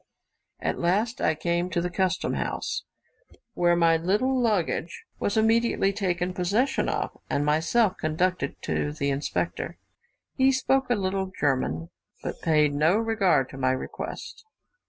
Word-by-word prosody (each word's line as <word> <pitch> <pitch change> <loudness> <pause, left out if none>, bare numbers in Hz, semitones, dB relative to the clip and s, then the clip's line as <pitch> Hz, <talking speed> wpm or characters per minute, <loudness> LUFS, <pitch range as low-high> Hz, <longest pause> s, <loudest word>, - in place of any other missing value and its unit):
At - - -2
last 205 +7 0
I - - +2
came 170 +3 -1
to 170 - 0
the 175 +1 -2
custom 185 0 0
house, - - -3 0.7
where 175 0 +3
my 165 -1 +4
little 210 +11 +1
luggage 205 -8 0 0.2
was 205 - 0
immediately 225 -2 +3
taken 180 -2 -1
possession 205 +10 +1
of, - - -2
and 145 - 0
myself 180 +8 +2
conducted 160 -1 -1
to 145 - -1
the 140 -2 -1
inspector. 140 +2 -2 0.6
He 265 0 +4
spoke 265 0 +1
a 245 - +3
little 190 -1 -2
German, 130 - 0 0.3
but - - -5
paid 150 -2 +3
no 155 +7 +3
regard 215 - +2
to 135 - -9
my 130 0 +2
request. 130 - -6
180 Hz, 140 wpm, -26 LUFS, 155-215 Hz, 0.7 s, my